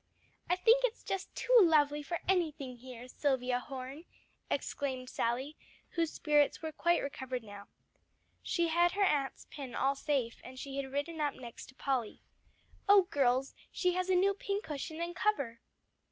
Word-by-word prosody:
"I 355 Hz, -, +4 dB
think 460 Hz, +7 st, +5 dB
it's -, -, 0 dB
just 390 Hz, 0 st, -3 dB
too -, -, +2 dB
lovely 295 Hz, -5 st, +4 dB
for 340 Hz, +4 st, -4 dB
anything 305 Hz, -9 st, 0 dB
here, 250 Hz, 0 st, -10 dB
Silvia 255 Hz, -2 st, 0 dB
Horne," 270 Hz, +4 st, -7 dB, 0.4 s
exclaimed 260 Hz, -3 st, -2 dB
Sally, 260 Hz, +6 st, -1 dB, 0.3 s
whose 330 Hz, -2 st, 0 dB
spirits 295 Hz, -2 st, +2 dB
were 315 Hz, -, -2 dB
quite 345 Hz, +3 st, +2 dB
recovered 260 Hz, -3 st, -4 dB
now. 205 Hz, -1 st, -10 dB, 0.7 s
She 340 Hz, -1 st, 0 dB
had 345 Hz, +2 st, +3 dB
her 405 Hz, +1 st, +2 dB
aunt's 285 Hz, -7 st, +1 dB
pin 265 Hz, -5 st, -7 dB
all 275 Hz, -, +2 dB
safe, 270 Hz, -4 st, -1 dB
and 255 Hz, +1 st, -10 dB
she 275 Hz, +1 st, -6 dB
had 270 Hz, -1 st, -3 dB
ridden 305 Hz, +3 st, -2 dB
up 290 Hz, -2 st, 0 dB
next 240 Hz, -2 st, -9 dB
to 270 Hz, -, -16 dB
Polly. 260 Hz, -6 st, -2 dB, 0.7 s
"Oh 400 Hz, -1 st, +8 dB
girls, 265 Hz, -1 st, +2 dB, 0.2 s
she 360 Hz, -1 st, +1 dB
has 365 Hz, +1 st, -1 dB
a 370 Hz, -, +4 dB
new 390 Hz, +2 st, +4 dB
pincushion 335 Hz, -6 st, -4 dB
and 345 Hz, +1 st, -3 dB
cover." 280 Hz, -, 0 dB
290 Hz, 160 wpm, -33 LUFS, 260-345 Hz, 0.7 s, Oh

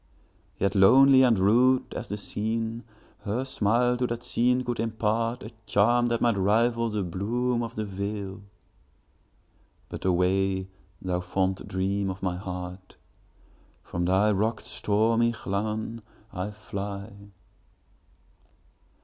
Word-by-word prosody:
Yet 100 Hz, -1 st, 0 dB
lonely 130 Hz, +7 st, +7 dB
and 120 Hz, -4 st, +4 dB
rude 125 Hz, +7 st, +3 dB
as -, -, -5 dB
the 105 Hz, -, -3 dB
scene, 110 Hz, +3 st, -3 dB, 0.4 s
Her 110 Hz, +5 st, -2 dB
smile 125 Hz, 0 st, +1 dB
to 125 Hz, 0 st, 0 dB
that 120 Hz, 0 st, -4 dB
scene 125 Hz, +1 st, +1 dB
could 120 Hz, -1 st, -3 dB
impartA 115 Hz, +1 st, -1 dB, 0.2 s
charm 120 Hz, +4 st, +3 dB
that 115 Hz, -1 st, -1 dB
might 115 Hz, -4 st, +2 dB
rival 115 Hz, +4 st, +2 dB
the 105 Hz, -2 st, -2 dB
bloom 120 Hz, +7 st, -1 dB
of 115 Hz, 0 st, -5 dB
the 110 Hz, -, -2 dB
vale,—But 100 Hz, +1 st, -10 dB
away, 95 Hz, +1 st, +1 dB, 0.3 s
thou 90 Hz, -1 st, -1 dB
fond 95 Hz, +1 st, -2 dB
dream 100 Hz, +1 st, -1 dB
of 95 Hz, +1 st, -6 dB
my 90 Hz, -2 st, 0 dB
heart! 90 Hz, 0 st, -7 dB, 0.9 s
From 85 Hz, 0 st, -3 dB
thy 95 Hz, +4 st, +3 dB
rocks, 110 Hz, +3 st, -1 dB
stormy 115 Hz, +3 st, +1 dB
Llannon, 110 Hz, +2 st, -3 dB, 0.3 s
I 90 Hz, +3 st, -3 dB
fly. 100 Hz, -1 st, -6 dB
105 Hz, 115 wpm, -27 LUFS, 95-115 Hz, 0.9 s, lonely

